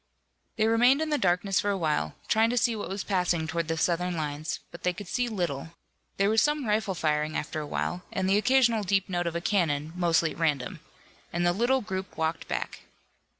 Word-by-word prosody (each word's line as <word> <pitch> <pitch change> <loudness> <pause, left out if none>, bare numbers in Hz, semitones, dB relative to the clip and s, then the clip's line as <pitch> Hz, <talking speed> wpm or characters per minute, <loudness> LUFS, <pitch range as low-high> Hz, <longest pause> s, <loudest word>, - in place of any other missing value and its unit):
They 220 - +2
remained 240 +5 +5
in 315 -1 -1
the 295 - +2
darkness 185 +2 +2
for 205 - 0
a 200 - +1
while, 150 - -1
trying 225 +1 +3
to 245 - -1
see 235 -1 +2
what 210 - -5
was 195 +1 -3
passing 180 -4 0
toward 165 0 -2
the 165 0 -1
Southern 175 +1 0
lines, 150 +1 -3
but 170 - -11
they 180 - +1
could 195 +1 -9
see 245 +7 0
little. 170 - -3 0.4
There 195 - +3
was 220 0 +4
some 295 -2 +1
rifle 210 -3 0
firing 155 -1 0
after 155 - -3
a 150 - -5
while, 175 +4 -2
and 190 -1 -1
the 195 +2 +4
occasional 240 -2 +3
deep 195 -1 +1
note 175 -1 -1
of 170 - -3
a 170 - -1
cannon, 160 -6 0
mostly 170 -2 +2
at - - -10
random 145 -6 0 0.5
and 175 0 0
the 175 - +3
little 245 +6 +2
group 190 -3 -5
walked 160 0 -1
back. - - -3
180 Hz, 215 wpm, -28 LUFS, 165-215 Hz, 0.5 s, remained